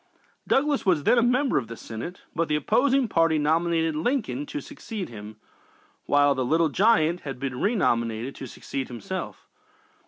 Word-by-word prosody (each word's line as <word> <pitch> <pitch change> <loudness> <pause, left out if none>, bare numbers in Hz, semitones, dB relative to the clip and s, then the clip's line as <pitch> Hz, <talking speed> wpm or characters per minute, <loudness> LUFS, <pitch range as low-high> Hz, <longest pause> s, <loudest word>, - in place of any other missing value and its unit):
Douglas 290 +1 +2
was 170 -6 +2
then 245 - +4
a - - +4
member 250 - +2
of 120 - -7
the 115 0 -8
Senate, 115 +11 -7
but 165 0 0
the 150 - +1
opposing 260 - +2
party 165 -5 +2
nominated 160 +1 +1
Lincoln 155 - -1
to - - -4
succeed 200 +7 -7
him, 105 -1 -9 0.7
while 145 0 +4
"the 130 - -1
Little 160 +5 +2
Giant" 180 -2 +3
had 135 -6 -7
been 130 -2 -4
renominated 120 - 0
to 135 - -7
succeed 135 +2 -5
himself. 120 -4 -6
155 Hz, 160 wpm, -25 LUFS, 130-200 Hz, 0.7 s, then